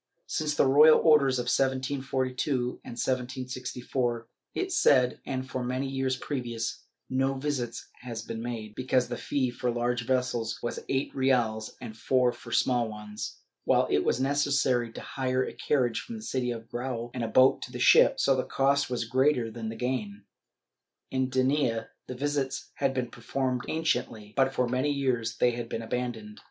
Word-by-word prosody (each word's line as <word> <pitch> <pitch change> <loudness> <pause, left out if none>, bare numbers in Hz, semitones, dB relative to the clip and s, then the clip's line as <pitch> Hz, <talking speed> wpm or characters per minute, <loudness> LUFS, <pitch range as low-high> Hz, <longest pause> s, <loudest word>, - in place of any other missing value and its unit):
Since 150 -1 -1
the - - +4
royal 150 +4 +7
orders 140 -5 +4
of 125 - -1
1742 130 0 -1
and 125 - -8
1764, 125 -1 -2 0.3
it 375 0 -1
said, 130 - +4
and 130 -1 -3
for 130 0 -3
many 130 +2 -2
years 135 -1 -1
previous, 120 -6 -4 0.2
no 135 +1 +1
visits 130 -4 -3
had 120 -2 -6
been 115 - -4
made, 115 -3 -5
because 130 0 +1
the 120 - -2
fee 130 +1 -1
for 125 0 -2
large 120 0 -1
vessels 125 -3 0
was 120 - -3
eight 135 +1 -1
reales 120 -5 +1
and 110 - -8
four 125 +2 +2
for - - -12
small 120 -3 +2
ones, 105 0 -7 0.2
while - - +4
it 75 - +3
was - - +1
necessary 135 -3 +1
to - - -8
hire 130 -1 -1
a - - -6
carriage 125 -5 0
from 235 - -8
the 220 - -8
city 125 - -1
to 120 - -3
the 115 - -13
Grao 120 0 -4
and 125 - -3
a - - -1
boat 130 +4 +5
to - - -7
the - - -6
ship, - - +6
so 135 - +4
the 130 - 0
cost 140 +1 +1
was 120 -2 -1
greater 130 -1 +2
than 110 0 -5
the 115 - -6
gain. 110 -4 -3 0.9
In 130 -1 0
Denia 130 -3 +1 0.2
the 130 - -5
visits 140 0 -2
had 135 -1 0
been 125 -2 -2
performed 130 -2 -2
anciently, 115 -9 -1
but 135 0 +3
for 125 -2 0
many 130 +4 0
years 125 -5 -1
they 125 - +4
had 120 -1 -5
been 115 - -3
abandoned. 115 -3 -4
125 Hz, 175 wpm, -28 LUFS, 120-135 Hz, 0.9 s, royal